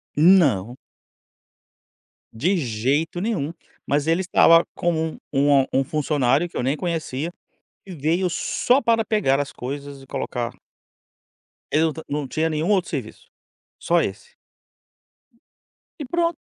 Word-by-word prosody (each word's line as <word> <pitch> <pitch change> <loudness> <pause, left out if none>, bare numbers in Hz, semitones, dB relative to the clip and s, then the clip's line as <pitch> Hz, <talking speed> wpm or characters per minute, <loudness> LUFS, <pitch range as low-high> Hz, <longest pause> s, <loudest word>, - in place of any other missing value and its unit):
Não. 145 - +4 1.6
De 180 - +1
jeito 140 +7 -1
nenhum, 170 -8 -2 0.3
mas 145 +1 0
ele 165 +3 +2
estava 165 -2 +5
com 175 - 0
um 160 -1 -2 0.4
um - - -2
um 135 - +2
funcionário 145 +1 +1
que - - -8
eu - - -1
nem 135 +3 +1
conhecia, 165 -2 -3 0.5
que 190 - -9
veio 165 +4 0
só 250 +9 +1
para 225 -1 +2
pegar 210 - +1
as 140 - -5
coisas 140 +2 -7
e 135 - -15
colocar 120 -2 -3 1.2
Ele 155 +2 +3
não 160 - 0 0.3
não 140 - -6
tinha 160 +4 -1
nenhum 155 +3 -1
outro 195 -4 +2
serviço, - - -6 0.5
só - - +2
esse. 475 0 -6 1.6
E 290 - -4
pronto, 335 +3 0
160 Hz, 130 wpm, -22 LUFS, 140-180 Hz, 1.6 s, estava